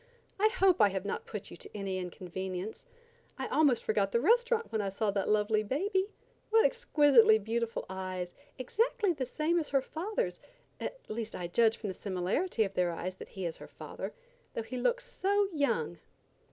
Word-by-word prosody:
I 425 - +6
hope 390 - +3
I 205 - +7
have 190 0 -3
not 200 - -3
put 210 - -6
you - - -9
to 210 - -9
any 195 -2 -2
inconvenience. 185 +2 -5 0.5
I 265 - -3
almost 280 -4 +3
forgot 200 -2 +1
the 235 - +3
restaurant 465 - +3
when 220 - 0
I 200 - -1
saw 200 +2 0
that 195 -1 -1
lovely 215 0 +3
baby. 380 - 0 0.4
What 445 +1 +5
exquisitely 290 - +5
beautiful 225 +2 -2
eyes! 185 -1 -4 0.2
Exactly 410 - +1
the 265 -5 -3
same 320 +6 +1
as 310 - -3
her 275 -1 +3
father's, 420 - -2 0.4
at - - -4
least 225 0 -4
I 180 - -4
judge 225 +6 +3
from 210 - -4
the - - -3
similarity 200 - 0
of 195 -2 -4
their 180 -2 +2
eyes 175 +2 -3
that - - -10
he 190 -2 -5
is 165 - -3
her - - -10
father, - - -7 0.4
though 230 - -2
he 240 +3 -7
looks - - +1
so 405 +1 +1
young." 285 -2 0
225 Hz, 185 wpm, -31 LUFS, -, 0.5 s, I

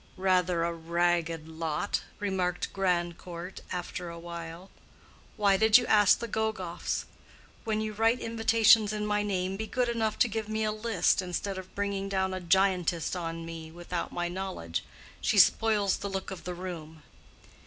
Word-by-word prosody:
"Rather 180 -2 +2
a 170 0 0
ragged 170 -1 0
lot," 160 +3 -2 0.2
remarked 185 -3 -1
Grandcourt, 175 -1 -2
after 180 -1 -4
a 170 - -8
while. 170 +1 -8 0.7
"Why 200 -2 +4
did 220 +2 +7
you 245 - 0
ask 205 -4 +5
the 235 - -5
Gogoffs? 210 -6 -2 0.6
When 215 -1 0
you 215 0 -3
write 225 +3 +2
invitations 225 -1 +4
in 210 0 -2
my 210 0 +1
name, 190 -2 -1
be 220 +1 -4
good 250 0 0
enough 225 -2 0
to - - +4
give 220 -1 -4
me 220 0 -1
a 215 - +1
list, 215 -5 +1
instead 185 +2 -3
of 185 0 -12
bringing 200 -1 -2
down 190 -1 0
a 185 - -3
giantess 180 -2 +2
on 165 -1 -4
me 165 -1 -7
without 175 +1 -4
my 175 0 -2
knowledge. 180 - -4 0.4
She - - +1
spoils 210 -3 +4
the 200 - -4
look 195 0 -4
of 190 - -8
the 180 0 -4
room." 160 -4 -7
190 Hz, 165 wpm, -29 LUFS, 175-210 Hz, 0.7 s, did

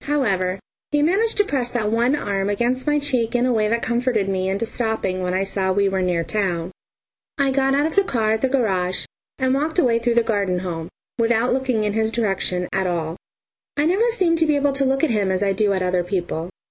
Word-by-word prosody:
However, 195 -11 0 0.3
he 295 0 +2
managed 405 +8 +1
to 415 - +5
press 260 -8 -1
that 220 -4 -1
one 240 +5 +2
arm 200 -7 -2
against 240 +6 -1
my 295 0 +3
cheek 255 -6 0
in 245 0 +2
a 255 - +2
way 215 -2 +2
that 230 +2 0
comforted 235 -3 0
me 190 -1 -1
into 195 +4 -1
stopping 220 -5 -2
when 180 0 -1
I 190 - +1
saw 195 -1 -1
we 200 +1 +2
were 190 -1 0
near 175 -2 0
town. 180 -2 -2 0.7
I 280 -2 +2
got 270 0 +2
out 290 +1 +2
of 320 - -2
the 400 - +5
car 225 - 0
at 220 0 0
the 265 - +2
garage 190 -9 0 0.3
and 260 -1 +1
walked 305 +5 -1
away 240 -9 +3
through 235 0 0
the 235 - +4
garden 200 -5 0
home, 170 -2 -5 0.3
without 230 +1 +2
looking 255 -4 0
in 210 -1 -1
his 220 0 0
direction 195 -5 -1
at 190 -1 0
all. 165 -2 -2 0.6
I 290 - +2
never 415 +8 +2
seem 370 -7 +2
to 325 - +3
be 300 - +3
able 285 -1 +1
to 275 0 0
look 270 +3 +1
at 320 - +3
him 205 -3 +1
as 190 +1 0
I 195 -1 +1
do 205 +1 +1
at 190 -1 0
other 180 -1 +1
people. 175 -2 -3
225 Hz, 235 wpm, -21 LUFS, 190-270 Hz, 0.7 s, to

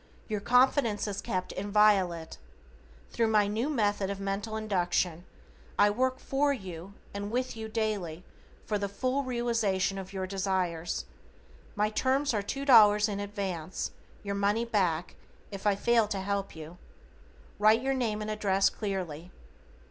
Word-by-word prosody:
Your 215 -2 -2
confidence 245 -2 +3
is 205 -1 -3
kept 185 -1 -3
inviolate. 195 -5 +2 0.7
Thru 230 -1 +1
my 215 -2 +4
new 220 +7 -1
Method 205 -7 0
of 200 -1 -4
Mental 200 +3 -3
Induction, 180 -4 0 0.5
I 205 - +5
work 255 +4 0
for 285 +1 +1
you 190 -6 -6 0.2
and 200 0 -4
with 250 +2 -2
you 220 -1 -6
daily 205 -7 -2 0.4
for 210 -1 -1
the 200 0 -2
full 255 +7 -1
realization 230 -7 0
of 190 0 -8
your 190 -1 -3
desires. 185 -3 -2 0.7
My 210 0 +1
terms 265 +4 +1
are 210 - +1
$2 215 -3 +5
in 200 -1 -3
advance, 195 -5 -4 0.3
your 200 -1 -3
money 205 +3 +1
back, 180 -7 0 0.3
if 200 +1 -4
I 205 - +4
fail 230 +1 +3
to 205 -2 -3
help 200 -1 -2
you. 160 +2 -10 0.8
Write 215 +3 +5
your 270 0 +1
name 220 -5 -1
and 215 - -3
address 195 -2 +2
clearly. 180 -6 -4
205 Hz, 145 wpm, -29 LUFS, 190-225 Hz, 0.8 s, I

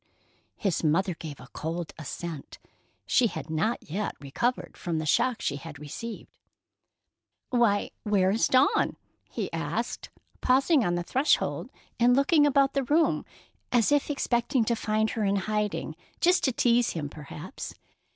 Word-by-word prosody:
His 190 -5 -1
mother 175 +4 +2
gave 155 -3 -8
a 125 - -12
cold 165 +1 -4
assent. 160 0 -6 0.5
She 245 - +4
had 165 - -6
not 215 +9 -1
yet 200 +7 -3
recovered 190 - -2
from 170 -2 -3
the 155 - -2
shock 235 - +2
she 140 - -1
had 150 +1 -9
received. 180 +11 -8 1.1
"Why, 235 -5 +2
where 195 -3 +2
is 220 - +2
Dawn?" 260 +2 +3 0.3
he - - -4
asked, - - -3 0.3
pausing 270 +2 +4
on 175 -3 +1
the 175 - -1
threshold 265 - +1 0.3
and 245 +1 +5
looking 290 +2 +4
about 275 -1 +3
the 275 - +1
room, 315 +5 +2 0.5
as 240 +1 +3
if 290 0 +2
expecting 245 -3 +1
to 235 - +1
find 215 0 0
her 225 - -2
in 200 0 +2
hiding, 210 -5 -2 0.2
just 360 +2 +4
to 265 - +3
tease 240 0 +2
him, 155 -4 -3
perhaps. 150 - -8
215 Hz, 150 wpm, -27 LUFS, 165-255 Hz, 1.1 s, and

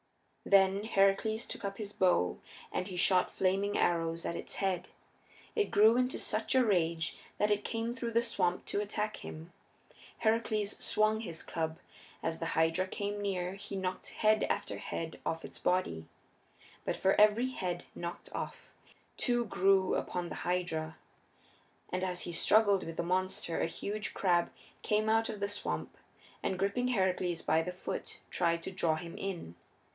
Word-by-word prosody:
Then 195 +1 +4
Heracles 215 +2 +2
took - - -6
up 195 0 -3
his 210 -2 -6
bow 175 - +2 0.3
and 185 - -2
he 185 -2 -6
shot 185 0 +4
flaming 195 +2 +1
arrows 165 -1 +1
at 170 - -2
its - - -5
heads. 185 -2 -1 0.7
It 425 -2 +2
grew 220 +3 +6
into 250 +1 +1
such 220 +4 0
a 260 -1 +5
rage 165 -5 +1 0.2
that 210 0 +2
it 205 0 +2
came 230 +1 -2
through 240 -2 -3
the 230 +1 +3
swamp 185 -6 0
to 205 - 0
attack 210 +1 -2
him. 160 +2 -9 0.6
Heracles 220 -2 +1
swung 215 0 +2
his 170 -7 -3
club. 160 -1 -2 0.5
As 165 0 -1
the 165 - -2
Hydra 165 +3 +3
came 205 +1 -3
near 185 -2 -1
he 200 0 -7
knocked 185 -1 -3
head 215 0 +3
after - - -2
head 165 -1 -5
off 165 0 -2
its - - -10
body. 180 - 0 0.8
But - - -2
for 190 0 +3
every 215 +4 +5
head 180 -7 -3
knocked 170 0 -6
off - - -6 0.4
two 240 -1 +2
grew 190 -1 +3
upon 175 -1 -2
the - - -5
Hydra. 165 -3 -1 0.9
And 185 +1 -1
as 180 -1 -2
he 175 - -4
struggled 205 +1 +4
with 165 0 -7
the - - 0
monster 185 -1 -1
a - - +2
huge 205 +5 -4
crab 175 -3 +2 0.3
came 215 +1 +1
out 225 +1 +3
of 215 - -5
the 200 - 0
swamp, 205 0 -4 0.5
and 190 - -1
gripping 200 +7 +1
Heracles 185 -6 +1
by 160 +1 +3
the 180 +2 -3
foot 180 - -6
tried 170 -1 +1
to - - -4
draw 170 -4 +1
him 170 +1 -7
in. 180 - -4
190 Hz, 165 wpm, -32 LUFS, 175-210 Hz, 0.9 s, grew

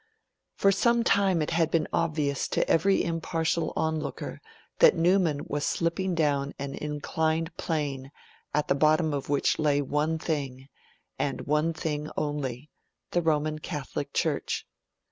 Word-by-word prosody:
For 195 - +4
some 235 +4 +3
time 195 -7 +3
it - - -3
had 165 -1 +2
been 160 -1 +1
obvious 150 -4 0
to - - 0
every 195 +4 +3
impartial 165 0 -1
onlooker 160 -1 -3 0.4
that - - +7
Newman 170 -3 +2
was 145 0 -2
slipping 175 +3 0
down 145 -3 0
an 140 0 -5
inclined 160 +3 -2
plane 140 -6 -3 0.4
at 150 - 0
the - - +3
bottom 155 +2 +3
of 140 -1 -3
which 145 -1 +1
lay 145 -2 +3
one 150 +3 0
thing, 140 -5 -3 0.5
and - - -1
one 150 +3 +1
thing 155 -2 -3
only 145 -2 -3 0.4
the 175 - +2
Roman 155 -1 0
Catholic 150 -3 -5
Church. - - -1
155 Hz, 140 wpm, -27 LUFS, 145-165 Hz, 0.5 s, that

